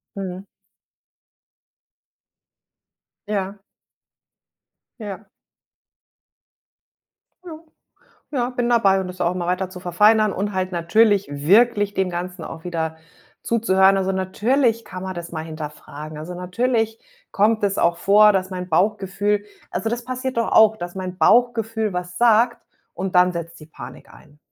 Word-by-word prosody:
Mhm. 190 Hz, 0 st, -6 dB, 2.8 s
Ja. 200 Hz, -1 st, -3 dB, 1.4 s
Ja. 205 Hz, -1 st, -8 dB, 2.2 s
Ja, 320 Hz, -2 st, -9 dB, 0.7 s
ja, 250 Hz, -4 st, -1 dB
bin 245 Hz, -1 st, -2 dB
dabei 200 Hz, -5 st, +3 dB
und 185 Hz, -, -5 dB
das 180 Hz, 0 st, -10 dB
auch 175 Hz, +1 st, +1 dB
immer 175 Hz, -1 st, -3 dB
weiter 185 Hz, +1 st, -1 dB
zu 180 Hz, -, -10 dB
verfeinern 210 Hz, +4 st, +3 dB
und 205 Hz, +2 st, -3 dB
halt 185 Hz, -1 st, -2 dB
natürlich 200 Hz, +4 st, +2 dB
wirklich 205 Hz, +8 st, +3 dB
dem 190 Hz, -1 st, 0 dB
Ganzen 175 Hz, 0 st, -5 dB
auch 160 Hz, 0 st, -9 dB
wieder 160 Hz, -2 st, -3 dB, 0.5 s
zuzuhören. 195 Hz, -4 st, +3 dB
Also, 190 Hz, 0 st, 0 dB
natürlich 230 Hz, +5 st, 0 dB
kann 185 Hz, -2 st, -8 dB
man 190 Hz, 0 st, -5 dB
das 170 Hz, -1 st, -8 dB
mal 160 Hz, -1 st, -4 dB
hinterfragen. 155 Hz, -1 st, -8 dB
Also, 170 Hz, +4 st, -7 dB
natürlich 225 Hz, +5 st, -1 dB, 0.3 s
kommt 215 Hz, +2 st, +2 dB
es 200 Hz, -1 st, 0 dB
auch 170 Hz, 0 st, +2 dB
vor, 210 Hz, +3 st, +5 dB
dass 190 Hz, -1 st, -1 dB
mein 180 Hz, -1 st, -5 dB
Bauchgefühl 205 Hz, +3 st, 0 dB, 0.3 s
also, 225 Hz, -, -2 dB
das 240 Hz, +1 st, -3 dB
passiert 255 Hz, 0 st, -4 dB
doch 230 Hz, -, 0 dB
auch, 220 Hz, 0 st, +6 dB
dass 175 Hz, -2 st, -7 dB
mein 185 Hz, -1 st, -5 dB
Bauchgefühl 225 Hz, -2 st, +2 dB
was 180 Hz, 0 st, -5 dB
sagt 235 Hz, 0 st, +3 dB, 0.3 s
und 190 Hz, 0 st, -4 dB
dann 180 Hz, 0 st, +5 dB
setzt 170 Hz, -1 st, -7 dB
die 155 Hz, -, -12 dB
Panik 130 Hz, -5 st, -12 dB
ein, 150 Hz, -1 st, -19 dB
190 Hz, 135 wpm, -21 LUFS, 180-220 Hz, 2.8 s, auch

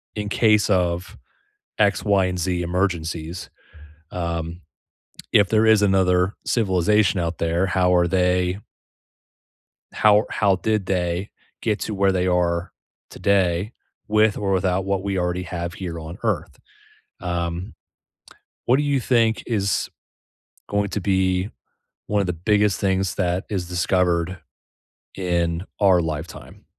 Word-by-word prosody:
in 105 Hz, -1 st, -3 dB
case 105 Hz, -1 st, +3 dB
of 90 Hz, -2 st, 0 dB, 0.6 s
x, 105 Hz, -1 st, +2 dB
y, 100 Hz, -3 st, +3 dB
and 90 Hz, 0 st, -3 dB
z 90 Hz, 0 st, -1 dB
emergencies. 85 Hz, -2 st, -2 dB, 0.6 s
Um, 85 Hz, 0 st, -4 dB, 0.7 s
if 100 Hz, -2 st, +5 dB
there 110 Hz, +1 st, +3 dB
is 110 Hz, -2 st, +5 dB
another 95 Hz, -1 st, +2 dB
civilization 100 Hz, -3 st, +2 dB
out 85 Hz, 0 st, -3 dB
there, 85 Hz, +3 st, 0 dB
how 90 Hz, -1 st, +2 dB
are 90 Hz, -1 st, +4 dB
they 90 Hz, 0 st, +1 dB, 1.3 s
how 105 Hz, -1 st, +5 dB
ar 105 Hz, -, -1 dB
how 100 Hz, -3 st, +2 dB
did 105 Hz, +1 st, -1 dB
they 90 Hz, +1 st, -1 dB, 0.3 s
get 110 Hz, -2 st, 0 dB
to 110 Hz, -, -4 dB
where 95 Hz, -1 st, +2 dB
they 90 Hz, -1 st, 0 dB
are 90 Hz, 0 st, 0 dB, 0.4 s
today 95 Hz, +1 st, +1 dB, 0.4 s
with 110 Hz, 0 st, +3 dB
or 100 Hz, -1 st, -1 dB
without 95 Hz, 0 st, +1 dB
what 95 Hz, -1 st, -1 dB
we 100 Hz, -1 st, -2 dB
already 90 Hz, 0 st, -1 dB
have 85 Hz, -1 st, -5 dB
here 85 Hz, -3 st, -6 dB
on 80 Hz, +2 st, -8 dB
Earth? -, -, -2 dB, 0.6 s
Um, 85 Hz, +1 st, -3 dB, 0.9 s
what 125 Hz, -, +4 dB
do 145 Hz, -, +1 dB
you 140 Hz, -2 st, +1 dB
think 115 Hz, -3 st, +1 dB
is 100 Hz, -4 st, 0 dB, 0.8 s
going 100 Hz, 0 st, 0 dB
to 105 Hz, -, -2 dB
be 95 Hz, 0 st, +1 dB, 0.6 s
one 105 Hz, 0 st, +1 dB
of 100 Hz, -, 0 dB
the 90 Hz, -, -1 dB
biggest 105 Hz, +3 st, +1 dB
things 95 Hz, -1 st, 0 dB
that 90 Hz, 0 st, -1 dB
is 95 Hz, -4 st, -3 dB
discovered 90 Hz, 0 st, 0 dB, 0.8 s
in 85 Hz, -2 st, -1 dB, 0.2 s
our 95 Hz, -3 st, +5 dB
lifetime? 80 Hz, 0 st, -7 dB
95 Hz, 135 wpm, -22 LUFS, 85-100 Hz, 1.3 s, if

